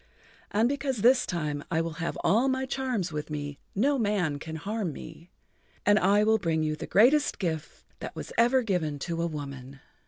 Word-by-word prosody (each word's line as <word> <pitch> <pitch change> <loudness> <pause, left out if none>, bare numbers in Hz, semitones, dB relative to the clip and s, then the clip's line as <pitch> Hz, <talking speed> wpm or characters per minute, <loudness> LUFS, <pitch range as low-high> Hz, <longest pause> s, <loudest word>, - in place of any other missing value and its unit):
And 220 +3 +2
because 270 -4 -2
this 250 +1 +5
time 150 -4 -2
I 165 - +1
will 165 +1 -3
have 165 - -2
all 230 +7 +3
my 260 0 0
charms 255 -9 -2
with 150 0 -4
me, 145 -1 -5 0.2
no 270 +7 +2
man 195 -9 0
can 160 +2 -7
harm 200 +2 -3
me. 165 +4 -11 0.6
And 205 +1 +5
I 200 +3 +4
will 220 +1 +3
bring 160 -4 0
you 155 0 0
the - - -7
greatest 275 +8 +4
gift 160 -5 -4
that - - -7
was - - -7
ever 245 +2 +4
given 175 -9 -1
to 165 +4 -3
a 170 - +1
woman." 140 -3 -7
180 Hz, 190 wpm, -28 LUFS, 155-230 Hz, 0.6 s, this